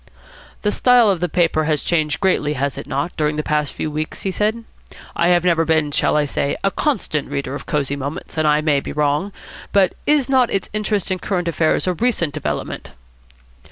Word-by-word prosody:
"The 210 - +2
style 245 -3 +5
of 185 - -1
the 180 +1 -1
paper 165 -2 +1
has 150 -2 0
changed 155 -3 0
greatly, 180 -6 +1
has 140 -1 -2
it 140 - -7
not, 145 +6 -2
during 150 -1 0
the 155 - -2
past 150 -2 0
few 155 - -4
weeks?" 155 +1 -4
he 195 - -1
said. 215 +4 -1 0.5
"I 170 - +2
have 175 -1 +4
never 170 -2 +3
been, 155 -2 +1
shall 150 - +1
I 150 - +2
say, 140 0 -1
a 195 - +2
constant 195 - -1
reader 140 -1 -3
of 140 - -7
Cosy 140 -2 -1
Moments, 140 +2 -6
and 155 -1 +1
I 150 0 +3
may 150 -2 +2
be - - -6
wrong. 150 +6 0 0.4
But 195 -3 +3
is 290 -4 +3
not 260 -3 +3
its 195 - -2
interest 210 -3 -1
in 185 - -1
current 180 -3 -2
affairs 165 -1 +1
a 185 - +1
recent 180 -7 0
development?" 65 - -4
160 Hz, 205 wpm, -20 LUFS, 150-195 Hz, 0.5 s, style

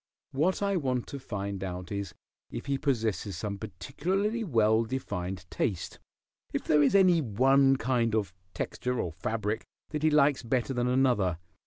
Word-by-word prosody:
What 170 +9 +1
I 200 -1 +1
want 130 -6 -1
to 140 - -6
find 100 -5 -4
out 90 -1 -5
is 100 -3 -4 0.3
if - - -6
he 140 -1 -1
possesses 110 - -1
some 100 +1 -4
particularly 195 - -2
well 110 - +3
defined 95 -7 -4
taste; 90 -5 -2 0.5
if - - -2
there 150 - +4
is 145 +7 +4
any 180 -4 +6
one 135 +3 +4
kind 120 -3 +1
of 100 -5 -1 0.2
texture 125 0 -2
or 85 - -2
fabric 105 +5 -2 0.3
that 150 -1 -3
he 155 - +4
likes 145 -2 +4
better 125 +2 -1
than 120 -1 0
another. 125 -9 +2
120 Hz, 160 wpm, -29 LUFS, 100-140 Hz, 0.5 s, any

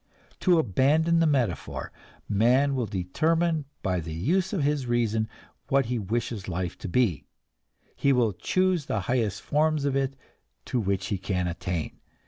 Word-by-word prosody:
To 180 -2 +4
abandon 155 - +3
the 165 - +4
metaphor, 125 - -1 0.4
man 125 +7 +3
will 125 -4 -1
determine 155 - 0 0.2
by 90 -1 0
the 80 -1 -6
use 180 - +1
of 185 -8 0
his 145 -3 0
reason 115 -2 +1 0.4
what 135 -1 +3
he 120 0 -1
wishes 110 0 -3
life 90 -1 -3
to 100 - -5
be; 90 - +1 0.7
he 140 - +2
will 120 -5 +3
choose 185 - 0
the 105 - -1
highest 110 0 -1
forms 155 -1 +1
of 140 -1 0
it 135 0 0 0.5
to 125 - -1
which 100 -2 -1
he 100 - -1
can 95 -2 -1
attain. 85 -1 -3
120 Hz, 155 wpm, -27 LUFS, 95-145 Hz, 0.7 s, To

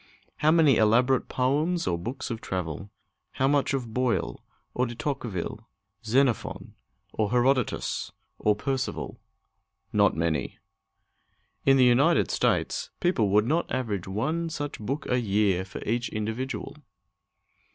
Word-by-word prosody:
How 150 - +3
many 155 -6 +5
elaborate 125 +5 +3
poems 150 +7 +1
or 85 - +1
books 120 +10 -5
of 115 - -4
travel? 90 +1 -4 0.4
How 135 - +1
much 140 0 +2
of 120 -4 -4
Boyle, 125 -1 -1 0.3
or 125 +1 +1
De 120 - -7
Tocqueville, 125 - -4 0.4
Xenophon, 125 +1 0 0.4
or 105 -2 0
Herodotus, 125 0 +1 0.3
or 105 -1 +3
Percival? 130 +4 -3 0.7
Not - - +4
many! 80 -4 -1 1.1
In 135 0 +7
the 130 - +6
United 140 +8 +4
States, - - +1
the - - -49
people 110 - +1
would 105 +2 +4
not 160 +7 0
average 105 -8 -2
one 155 - -1
such 145 -2 -5
book 135 +8 -3
a 125 - +2
year 100 -4 +1
for 95 - -8
each 120 +2 -1
individual! 120 +6 -4
125 Hz, 130 wpm, -27 LUFS, 105-135 Hz, 1.1 s, In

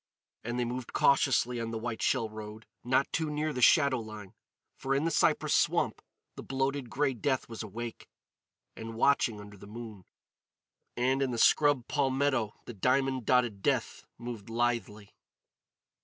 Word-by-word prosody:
And 120 +2 -3
they 120 - +1
moved 125 +1 -5
cautiously 130 -3 +3
on 115 - -3
the 115 - -4
white 110 0 -4
shell 125 -4 +1
road, 110 0 -9 0.2
not 130 +3 +1
too 160 -2 0
near 150 +1 -2
the 125 - -3
shadow 140 -1 +5
line. 110 -3 -9 0.4
For 135 0 -1
in 140 +3 +1
the 165 - +1
cypress - - +2
swamp - - +1 0.3
the - - -7
bloated 135 -1 -2
grey 140 +2 0
death 130 +1 -1
was 115 -1 -7
awake 115 +2 -7 0.7
and 115 0 -7
watching 120 -3 +2
under 105 0 -11
the 100 - -13
moon; 110 -3 -9 0.9
and 130 +3 +1
in 135 - +1
the 120 - -3
scrub 145 0 +4
palmetto 135 -5 0
the 120 - -7
diamond 130 +3 0
dotted 120 -6 +2
death - - -1
moved 120 -3 -7
lithely. 115 -3 -2
120 Hz, 155 wpm, -30 LUFS, 110-135 Hz, 0.9 s, shadow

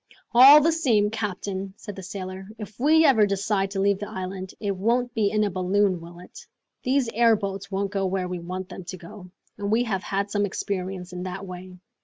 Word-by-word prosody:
"All 270 +5 +10
the 325 +3 +3
same, 230 -11 +2
captain," 195 -2 -4
said 205 -3 -9
the 190 - -8
sailor, 190 0 -7
"if 210 0 -9
we 315 +4 +5
ever 220 -8 +5
decide 195 0 0
to 195 0 -4
leave 200 0 +2
the 205 - -6
island, 185 0 -6
it 200 -2 -2
won't 235 +5 0
be 215 -3 +1
in 215 0 +1
a 205 - 0
balloon, 185 0 +1
will 170 +1 -12
it? 180 - -13 0.4
These 260 -1 +1
airboats 205 -4 +1
won't 195 0 -2
go 195 -2 0
where 185 -1 -2
we 180 -1 -4
want 185 +2 -6
them 190 - -8
to 185 +1 -7
go, 180 +2 -12 0.3
and 200 0 -2
we 230 +2 +3
have 195 -6 -2
had 200 0 -2
some 205 0 +1
experience 185 -2 -4
in 180 - -5
that 185 +1 -5
way! 185 0 -9
195 Hz, 210 wpm, -25 LUFS, 185-215 Hz, 0.4 s, All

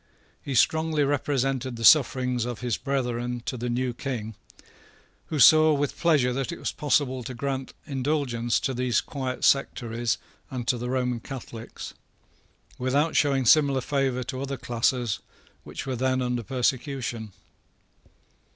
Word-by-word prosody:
He 140 - -4
strongly 160 +3 +3
represented 135 -2 0
the 115 0 -2
sufferings 125 -4 +5
of 120 0 -5
his 120 -3 0
brethren 125 -3 -2
to - - -3
the 120 0 -3
new 125 +1 -1
King, 115 -4 -4 0.9
who 155 - -3
saw 155 +2 +7
with 145 -1 -1
pleasure 145 -7 +2
that 135 +3 -2
it 170 - -6
was - - -3
possible 140 -3 0
to 125 +1 -7
grant 135 +1 -4
indulgence 130 -4 0
to 135 - -1
these 125 -2 +1
quiet 130 -3 -4
sectaries 120 -4 +1 0.3
and 125 -2 -5
to 125 - +1
the 125 +1 -4
Roman 125 -2 0
Catholics, 115 -2 -8 0.9
without 140 +5 +1
showing 135 -3 +2
similar 140 +1 +5
favour 135 -2 0
to 130 +1 -5
other 140 0 -3
classes 120 -2 0 0.4
which - - -7
were 130 -1 -2
then 130 +1 +1
under 125 -1 -1
persecution. 125 -2 -2
130 Hz, 140 wpm, -26 LUFS, 120-140 Hz, 0.9 s, saw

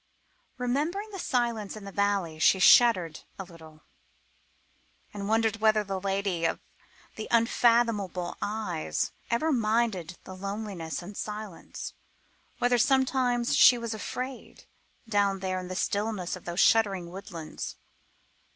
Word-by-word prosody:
Remembering 305 - -1
the 390 - -7
silence 235 - -1
in 205 - -10
the 200 - -7
valley, 195 -6 0
she 175 - +5
shuddered 185 -5 +5 0.2
a 195 - -5
little, 160 -4 -15 1.3
and 200 0 -5
wondered 225 0 +2
whether 215 -1 +3
the 195 -1 -3
lady 195 -3 -1
of 165 - 0 0.6
the 215 - -5
unfathomable 230 -6 +2
eyes 205 -6 -2 0.2
ever 310 +8 +1
minded 215 - 0
the 185 - -9
loneliness 195 -5 -5
and 200 +4 -9
silence; 210 -4 -6 0.6
whether 245 0 +2
sometimes 255 -2 +2
she 250 - +7
was 235 -1 -4
afraid 255 +4 -6 0.4
down 200 -2 +2
there 185 -1 -2
in 180 - -7
the 185 - -5
stillness 200 -2 -1
of 185 - -13
those 175 +1 -3
sheltering 195 -7 +3
woodlands. 175 -4 -7
205 Hz, 125 wpm, -28 LUFS, 185-235 Hz, 1.3 s, she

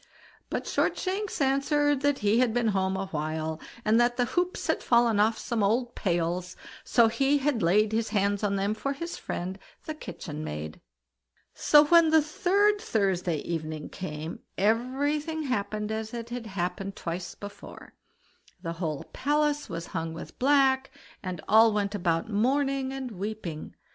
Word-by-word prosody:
But - - -3
Shortshanks 390 +2 -1
answered 280 +1 +2
that 285 -1 +2
he 210 +3 +4
had 245 -3 +2
been 240 -2 +2
home 190 -1 0
a 195 - -2
while, 155 +1 -3 0.2
and 220 +2 +4
that 240 0 +2
the 245 - +3
hoops 355 +7 -1
had - - 0
fallen 235 -3 +3
off 220 +2 +3
some 235 -2 -2
old 235 +4 +1
pails, 175 -1 -1 0.3
so 235 -2 +4
he 275 +5 +2
had 275 -4 0
laid 205 +5 +3
his 225 0 0
hands 205 -1 +1
on 200 -1 +1
them 200 +2 0
for 275 +6 -2
his 335 +5 -5
friend 185 +2 -5 0.3
the 310 - -3
kitchen 155 - -7
maid. 75 - -6 0.7
So 295 0 +6
when 335 +1 +6
the 315 -1 +5
third 400 +6 +2
Thursday 185 - 0
evening 155 -2 -4
came, 155 -3 -6 0.2
everything 285 - 0
happened 210 -4 -2
as 220 +1 -4
it 235 0 -6
had 240 -2 -5
happened 190 0 -3
twice 175 +1 -5
before; 205 0 -10 0.7
the 165 -2 -4
whole 160 -4 -3
palace 295 +1 0
was 165 0 -4
hung 165 0 -3
with 165 - -10
black, 270 0 +3 0.3
and 185 -4 -5
all 225 +1 +6
went 205 -1 -1
about 170 -4 0
mourning 265 +5 +1
and 265 -2 -5
weeping. 195 -5 -5
220 Hz, 160 wpm, -28 LUFS, 185-275 Hz, 0.7 s, So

